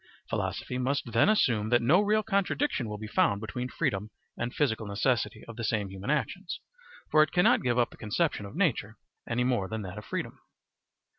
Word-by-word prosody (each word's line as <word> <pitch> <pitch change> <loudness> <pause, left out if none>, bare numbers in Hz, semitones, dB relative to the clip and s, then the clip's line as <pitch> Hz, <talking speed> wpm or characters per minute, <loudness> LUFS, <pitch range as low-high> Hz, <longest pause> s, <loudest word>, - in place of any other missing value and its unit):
Philosophy 125 - -2
must 130 -1 -1
then 115 - +4
assume 115 - +2
that 120 0 +5
no 150 - +4
real 215 +1 +2
contradiction 200 - 0
will 105 - -4
be 110 - -7
found 100 -1 +2
between 125 +4 -4
freedom 105 -3 -1 0.3
and 120 +1 -3
physical 115 -7 0
necessity 110 +2 0
of 115 -1 -9
the 115 - -4
same 105 -3 0
human 95 +5 -7
actions, 150 - -1 0.5
for 155 - +6
it 155 - +3
cannot 205 +7 +4
give 120 -1 +1
up 120 -1 +2
the - - -14
conception 110 -1 -1
of 100 - -11
nature 125 - 0 0.3
any 120 +1 +1
more 120 -6 +1
than 110 +1 -4
that 95 +2 -6
of - - -10
freedom. - - -4
120 Hz, 195 wpm, -29 LUFS, 105-150 Hz, 0.5 s, for